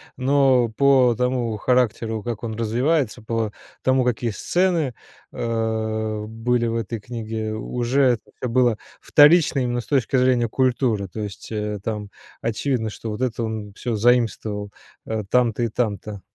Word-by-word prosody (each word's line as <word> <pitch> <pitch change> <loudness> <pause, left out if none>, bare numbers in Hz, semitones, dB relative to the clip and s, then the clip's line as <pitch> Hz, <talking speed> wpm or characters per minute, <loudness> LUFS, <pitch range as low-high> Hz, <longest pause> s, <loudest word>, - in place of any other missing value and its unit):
Но 130 -2 +3
по 130 0 +4
тому 125 -2 -1
характеру, 115 -2 +1
как 120 -1 -5
он 115 -1 -3
развивается, 120 +2 0
по 115 -1 -1 0.3
тому, 130 0 +3
какие 120 -1 0
сцены, 165 - 0 0.4
э, 110 -2 -2
были 120 +2 0
в 115 - -1
этой 115 0 -3
книге, 110 -1 -4
уже 125 +3 +1
как-то 125 - -6
было 120 -2 +2 0.2
вторично 150 -1 +5
именно 120 -1 -1
с - - -16
точки 135 -2 +1
зрения 125 -2 +3
культуры. 120 -4 +1
То 105 +4 -7
есть, 100 +1 -7
э, 105 -1 -3
там 105 -2 -4 0.3
очевидно, 115 0 -1
что 110 - -7
вот 105 +4 -5
это 120 -2 -1
он 110 -2 -4
всё 120 +1 -3
заимствовал, 110 -3 +1 0.4
э, 110 -1 -2
там-то 120 -2 +2
и - - +2
там-то. 105 -3 -3
115 Hz, 145 wpm, -22 LUFS, 110-125 Hz, 0.4 s, вторично